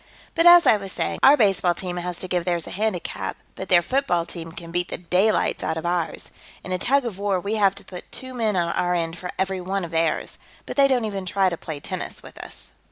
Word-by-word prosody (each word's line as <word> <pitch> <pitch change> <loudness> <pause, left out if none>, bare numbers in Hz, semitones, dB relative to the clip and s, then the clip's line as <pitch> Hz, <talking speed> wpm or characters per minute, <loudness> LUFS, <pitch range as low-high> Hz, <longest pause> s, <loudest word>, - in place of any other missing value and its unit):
But 335 +1 +4
as 345 0 +9
I 215 - +6
was 195 -2 -7
saying, - - -2
our 280 +2 +7
baseball 195 -6 +3
team 180 0 -5
has 175 0 -4
to 185 - -3
give 180 -1 0
theirs 175 -2 -1
a - - -8
handicap, 180 - -3 0.2
but 190 - -8
their 175 -2 +5
football 175 - 0
team 165 -1 -8
can 170 0 -9
beat 175 +1 0
the - - -5
daylights 185 +5 +1
out 160 - -1
of 160 - -5
ours. 175 -1 -2 0.3
In 185 - -7
a 185 - -1
tug 275 +4 +2
of 205 -5 -5
war, 200 -2 0
we 200 +4 -3
have 195 -2 +3
to - - -11
put 180 -1 -10
two 260 0 -7
men 225 -4 0
on 170 -2 0
our 180 0 0
end 165 0 -2
for 180 - -5
every 190 -1 -1
one 190 0 -2
of 170 - -10
theirs. 165 -1 -1 0.3
But - - -6
they 275 -1 +5
don't 250 -4 +1
even 195 -3 -4
try 190 +1 +2
to 170 - -3
play 160 -2 -7
tennis - - -5
with - - -13
us." - - -11
185 Hz, 250 wpm, -23 LUFS, 175-210 Hz, 0.3 s, as